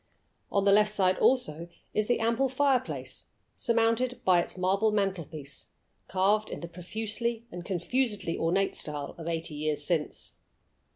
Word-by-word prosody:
On 200 -1 +2
the 200 - +6
left 210 +1 +5
side 185 -3 +2
also 170 - +2 0.2
is 215 0 +1
the 245 - +2
ample 230 +4 +2
fireplace, 265 -1 0 0.3
surmounted 235 +1 +1
by 180 -2 +5
its 170 - -7
marble 195 +4 +2
mantelpiece, 170 -8 -3 0.4
carved 200 +3 +2
in - - -6
the 170 - -5
profusely 220 +6 -3
and 175 0 -6
confusedly 200 0 -1
ornate 190 +4 +1
style 145 -2 -3
of 165 - -6
eighty 165 -1 -3
years 150 0 -2
since. 160 -3 -2
195 Hz, 140 wpm, -29 LUFS, 170-230 Hz, 0.4 s, the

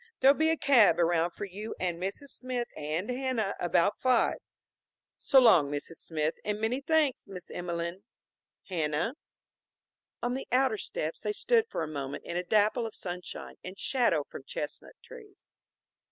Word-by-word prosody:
There'll 270 +1 +7
be 315 +2 +2
a 325 - +2
cab 235 - +5
around 170 0 +3
for 190 - -6
you 200 +3 -7
and 175 -2 -2
Mrs. 195 +9 -4
Smith 250 -2 -3
and 155 +6 -3
Hanna 250 -6 -1
about 175 +3 +2
five. 255 -2 +3 0.8
So 270 - +5
long, 180 - +6
Mrs. 145 +3 -5
Smith, 155 -1 -2
and 210 0 -2
many 230 +5 0
thanks. 305 -2 +1
Miss 185 -2 -10
Emelene, 170 +1 -4 0.7
Hanna." 165 - -1 1.1
On 245 +1 0
the 265 - -4
outer 255 -4 +3
steps 155 +1 -4
they 210 -1 -1
stood 460 - +2
for - - -2
a - - -3
moment 140 -2 -5
in 170 - -6
a 180 - 0
dapple 215 +4 +2
of 220 - -10
sunshine 180 -1 -6
and 185 +1 -8
shadow 235 - +2
from 140 - -10
chestnut 150 - -6
trees. 430 -6 -14
200 Hz, 160 wpm, -30 LUFS, 170-255 Hz, 1.1 s, There'll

